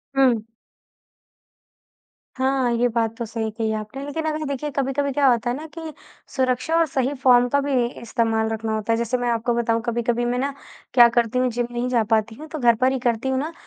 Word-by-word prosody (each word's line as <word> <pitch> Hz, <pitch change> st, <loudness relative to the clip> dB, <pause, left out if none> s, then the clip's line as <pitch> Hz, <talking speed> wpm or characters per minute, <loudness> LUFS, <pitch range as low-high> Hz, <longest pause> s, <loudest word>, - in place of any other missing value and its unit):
हुँ। 245 Hz, -5 st, +3 dB, 1.9 s
हाँ, 260 Hz, -1 st, +1 dB
ये 235 Hz, +1 st, +2 dB
बात 230 Hz, -1 st, -1 dB
तो 235 Hz, -, -3 dB
सही 225 Hz, 0 st, -3 dB
कही 220 Hz, 0 st, -2 dB
आपने, 215 Hz, +6 st, -5 dB
लेकिन 315 Hz, +3 st, -4 dB
अगर 310 Hz, 0 st, -2 dB
देखिए, 280 Hz, +1 st, -3 dB
कभी-कभी 275 Hz, +1 st, -1 dB
क्या 275 Hz, +1 st, +2 dB
होता 240 Hz, -1 st, +2 dB
है 240 Hz, -, -1 dB
ना 300 Hz, +3 st, -7 dB
कि 320 Hz, -1 st, -6 dB, 0.4 s
सुरक्षा 260 Hz, +4 st, 0 dB
और 335 Hz, -, +4 dB
सही 265 Hz, -1 st, -1 dB
फ़ॉर्म 245 Hz, -1 st, +6 dB
का 280 Hz, -, +2 dB
भी 285 Hz, 0 st, -3 dB
इ -, -, -1 dB
इस्तेमाल 225 Hz, -1 st, 0 dB
रखना 220 Hz, 0 st, -3 dB
होता 215 Hz, +1 st, -1 dB
है। -, -, +1 dB
जैसे 235 Hz, +2 st, -1 dB
मैं 245 Hz, 0 st, -1 dB
आपको 235 Hz, +1 st, 0 dB
बताऊँ, 230 Hz, -1 st, +1 dB
कभी-कभी 235 Hz, 0 st, 0 dB
मैं 245 Hz, +1 st, 0 dB
ना, 280 Hz, +2 st, -1 dB, 0.4 s
क्या 240 Hz, -1 st, +8 dB
करती 240 Hz, +1 st, +2 dB
हूँ, 255 Hz, 0 st, +2 dB
जिम 240 Hz, +1 st, -2 dB
नहीं 240 Hz, +1 st, -2 dB
जा 240 Hz, -3 st, +2 dB
पाती 220 Hz, 0 st, +1 dB
हूँ, 310 Hz, +6 st, -10 dB
तो 310 Hz, 0 st, -6 dB
घर 240 Hz, -3 st, +4 dB
पर 255 Hz, +1 st, +4 dB
ही 265 Hz, -, -1 dB
करती 240 Hz, 0 st, 0 dB
हूँ 260 Hz, 0 st, 0 dB
ना, 305 Hz, +4 st, -3 dB
245 Hz, 220 wpm, -22 LUFS, 230-270 Hz, 1.9 s, क्या